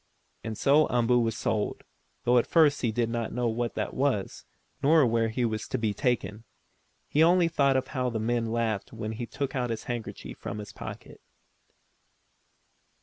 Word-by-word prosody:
And 110 -1 -5
so 150 +3 +4
Umboo 120 0 +2
was 115 -2 0
sold, 105 -1 -1 0.4
though 125 +1 +5
at - - -1
first 150 -4 +4
he 115 - +1
did 115 +1 0
not 115 0 -3
know 125 -1 0
what 115 -1 -2
that - - -2
was, - - -1 0.4
nor 155 0 +5
where 115 -1 +1
he 120 +2 -1
was 110 -1 -2
to - - -2
be 110 -3 0
taken. 115 -4 -1 0.6
He 150 - +2
only 175 +1 +5
thought 140 -5 +2
of 130 - -2
how 125 -2 -1
the 115 - -3
men 115 +1 0
laughed 110 -3 -1
when 110 - -5
he 115 +2 -5
took 140 +3 -4
out 125 -2 0
the 115 - -1
handkerchief 120 -2 -6
from - - -5
the 105 - -6
pocket. - - -9
120 Hz, 180 wpm, -28 LUFS, 115-130 Hz, 0.6 s, though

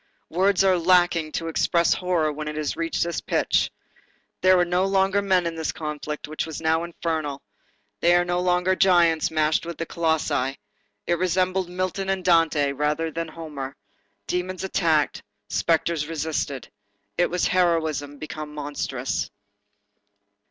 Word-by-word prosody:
Words 190 +3 +3
are 185 -2 +4
lacking 175 -2 +3
to 165 - -2
express 170 +1 +2
horror 175 -4 0
when 150 +1 -5
it 150 - -4
has 150 -1 -2
reached 165 0 -1
this 170 -1 -3
pitch. - - +1 0.7
There 185 0 +6
were 175 - +3
no 180 +1 +1
longer 195 +1 +2
men 190 -3 +2
in 170 - -1
this 160 -1 -2
conflict, 150 -1 -5
which 155 +1 -3
was 160 - -6
now 160 +1 +1
infernal. 160 -4 -3 0.6
They 175 +1 +5
were 175 - +2
no 175 0 0
longer 180 +1 +2
giants 170 -4 +4
matched 155 -1 +1
with 170 0 -6
colossi. 150 -5 0 0.5
It 175 -1 0
resembled 185 0 +1
Milton 185 +1 -2
and 190 -2 -1
Dante 165 -5 +3
rather 150 +3 -1
than 165 +1 -3
Homer. 150 -4 -7 0.5
Demons 180 - -3
attacked, 165 -6 +1 0.3
spectres 165 -2 +1
resisted. 155 -4 -3 0.4
It 175 - +2
was 180 0 0
heroism 160 -5 +1
become 155 0 -7
monstrous. 140 -3 -3
165 Hz, 145 wpm, -24 LUFS, 155-180 Hz, 0.7 s, There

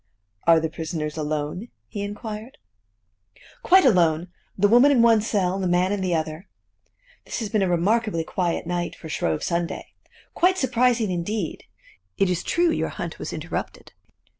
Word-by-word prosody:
"Are 165 -1 +7
the 160 - -1
prisoners 160 -1 -4
alone?" 155 +6 -3 0.2
he 205 - -6
inquired. 210 +3 -6 1.0
"Quite 375 -2 +5
alone: 170 -6 +3 0.3
the 205 +1 +4
woman 245 +7 +6
in 245 -4 +4
one 225 -2 +5
cell, 200 -4 0
and 195 - -3
the - - +1
man 180 +2 +2
in 205 -1 -1
the 180 -2 0
other. 160 +3 -4 0.8
This - - -5
has 220 -3 -3
been 210 0 +1
a 190 - +1
remarkably 190 +1 +1
quiet 175 +1 -2
night, 175 0 -2
for 160 - -10
Shrove 80 - -1
Sunday! 170 0 -2 0.4
Quite 370 +2 +3
surprising 245 - +2
indeed! 180 +1 -3 0.5
It 195 -2 +2
is 180 - -1
true 345 -1 +1
your - - -1
hunt - - -6
was - - -5
interrupted." - - -5
185 Hz, 165 wpm, -24 LUFS, 170-225 Hz, 1.0 s, Are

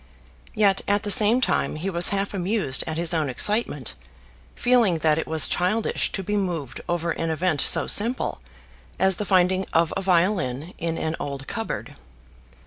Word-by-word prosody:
Yet 200 -3 +2
at 205 0 +1
the 205 - 0
same 215 +5 +6
time - - 0
he 160 +5 -5
was 170 0 +3
half 200 0 -2
amused 190 -6 0
at 160 -1 -4
his 170 0 0
own 155 -4 -1
excitement, 145 - +1 0.6
feeling 240 -8 +2
that 155 0 +3
it - - -4
was 160 -1 +3
childish 200 +6 -1
to 195 - -3
be 210 +3 -3
moved 170 -9 -4
over 170 -1 -1
an 165 0 -3
event 160 -2 0
so - - +2
simple 235 +5 +2 0.6
as 190 -1 +2
the 210 - -3
finding 185 0 +1
of 165 0 +1
a 195 - -2
violin 175 -5 0
in 165 0 -3
an 160 +1 -3
old 140 -1 -6
cupboard. 145 - -6
180 Hz, 170 wpm, -23 LUFS, 160-205 Hz, 0.6 s, same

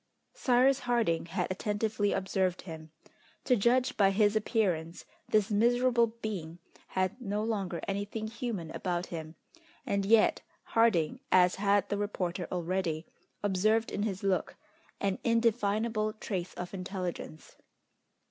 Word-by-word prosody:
Cyrus 260 +2 +3
Harding 230 -11 0
had 180 +1 -2
attentively 205 +1 0
observed 190 -1 0
him. 160 -3 -9 0.5
To 250 - +3
judge 245 +4 +2
by 195 -2 +5
his 205 +1 +3
appearance 180 -7 0 0.2
this 215 0 +2
miserable 240 +2 +3
being 210 -8 -6 0.3
had 190 +6 -1
no 210 -2 -2
longer 200 -6 -2
anything 205 +2 -3
human 220 -7 -4
about 175 -1 -2
him, 160 -1 -6 0.5
and 200 0 0
yet 215 +2 +4 0.2
Harding, 225 -2 +2
as 180 -1 +5
had 200 -1 +3
the 205 - -1
reporter 185 -3 -2
already, 175 -2 -1 0.4
observed 215 +3 +2
in - - -2
his 200 -3 -2
look 195 -2 0 0.4
an 195 -1 -1
indefinable 220 -1 +1
trace 185 -4 -4
of 180 +1 -6
intelligence. 185 -4 -6
200 Hz, 125 wpm, -30 LUFS, 180-225 Hz, 0.5 s, by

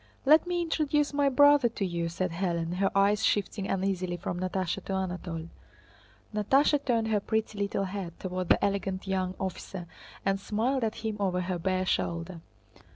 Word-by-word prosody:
"Let 310 +5 +6
me 350 -1 0
introduce 300 -3 +1
my 285 -1 +3
brother 285 -1 +6
to 215 -3 -3
you," 170 -2 -2
said 185 +1 -2
Hélène, 170 -1 -2
her 195 +1 +2
eyes 200 +2 +3
shifting 200 -1 0
uneasily 185 -2 -1
from 175 0 -4
Natásha 185 0 -2
to 195 - -3
Anatole. 175 -3 -4 0.8
Natásha 275 +7 +3
turned 230 -3 +1
her 215 -1 +2
pretty 220 0 -2
little 200 -1 0
head 185 -3 -6
toward 185 -1 -3
the - - +4
elegant 195 -1 -2
young 185 -1 -1
officer 190 -1 -5 0.4
and 195 0 +1
smiled 235 +6 0
at 220 -1 -1
him 215 -1 -2
over 185 -2 0
her 180 0 -2
bare 185 +1 0
shoulder. 170 -1 -2
195 Hz, 165 wpm, -29 LUFS, 180-220 Hz, 0.8 s, Let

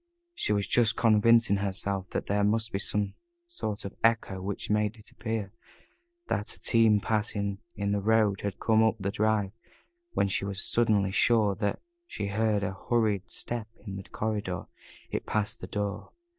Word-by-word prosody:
She 345 - -1
was 100 -2 +1
just 115 -1 +3
convincing 115 -1 +5
herself 100 -1 -2
that - - -3
there 100 +1 +1
must 110 +2 +1
be 100 - -1
some 100 0 -1 0.3
sort 110 - -5
of 100 - -5
echo 115 -4 +2
which 100 +1 -4
made 105 +1 +1
it 110 - -14
appear 110 -4 -4 0.7
that 105 - -2
a - - -16
team 110 -2 +4
passing 100 -2 -1 0.2
in 100 0 -1
the 100 0 +1
road 105 -2 +3
had 100 -3 -4
come 110 -1 +3
up 110 0 +4
the 100 0 -1
drive 105 -2 +1 0.6
when - - +2
she 100 - -1
was 100 -1 -3
suddenly 105 -5 +2
sure 110 -1 +3
that 100 +1 -2 0.2
she 100 - -4
heard 105 0 +1
a 100 -1 -2
hurried 110 -5 +1
step 120 -3 -3 0.2
in 100 -2 -5
the 95 - -5
corridor 105 -4 -2 0.5
it - - -3
passed 110 +1 -1
the - - -6
door. 105 -1 -3
105 Hz, 170 wpm, -29 LUFS, 100-110 Hz, 0.7 s, convincing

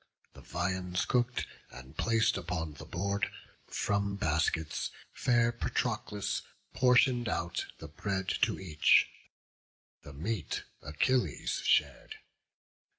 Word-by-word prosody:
The - - -13
viands 90 +1 -1
cook'd 125 -1 +1 0.2
and 65 +3 -12
plac'd 115 +2 +2
upon 80 -4 -3
the 70 - -11
board, 100 +2 -1 0.4
From 100 -1 0
baskets 80 -3 0 0.2
fair 120 -2 +3
Patroclus 120 -4 -1 0.3
portion'd 125 -2 +4
out 85 -3 -2
The 80 - -8
bread 95 +5 -3
to - - +2
each; 80 -5 +4 0.9
the 70 - -11
meat 85 +2 -3 0.2
Achilles 120 - 0
shar'd. - - +2
100 Hz, 100 wpm, -32 LUFS, 80-115 Hz, 0.9 s, portion'd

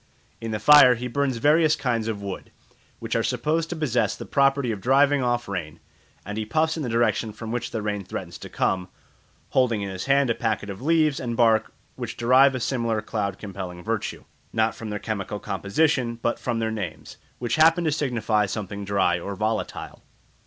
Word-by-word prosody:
In 115 - -4
the 110 - -1
fire 125 +2 +7
he 125 +2 -5
burns 135 0 -1
various 155 +5 +4
kinds 120 -6 -1
of 105 -3 -3
wood, 100 -2 -6 0.5
which - - -4
are - - +2
supposed 160 +2 -1
to 175 - -3
possess 125 - 0
the - - -8
property 140 -3 +2
of 105 -3 -5
driving 140 +3 +4
off 120 -1 0
rain; 80 -5 -5 0.5
and 105 +3 -4
he - - -1
puffs 160 +8 0
in 160 - -4
the 130 - -3
direction 115 -1 +1
from 110 +1 -7
which 120 0 -2
the 110 -2 -4
rain 105 -1 -2
threatens - - -7
to - - -9
come, 90 -1 -1 0.6
holding 120 -5 +1
in 100 - -4
his 95 0 -5
hand 140 -2 +3
a - - +3
packet 110 -3 -2
of 95 - -9
leaves 155 -1 +2
and 120 -2 -3
bark 115 -2 +3 0.3
which - - -5
derive 130 +3 +5
a - - -2
similar 115 -3 -1
cloud 100 -3 -3
compelling 95 -4 -7
virtue, 110 +1 -3 0.3
not 110 0 +1
from 110 - -7
their 105 - -3
chemical 105 -1 -4
composition, 120 +3 0
but 120 - 0
from 120 -2 -2
their 110 -1 -1
names, 100 -7 -6 0.2
which 120 -1 -2
happen 165 +2 +5
to 160 - +1
signify 115 -8 0
something 100 0 -5
dry 95 -3 +1
or 100 +3 -5
volatile. 110 +2 -3
115 Hz, 195 wpm, -24 LUFS, 105-135 Hz, 0.6 s, fire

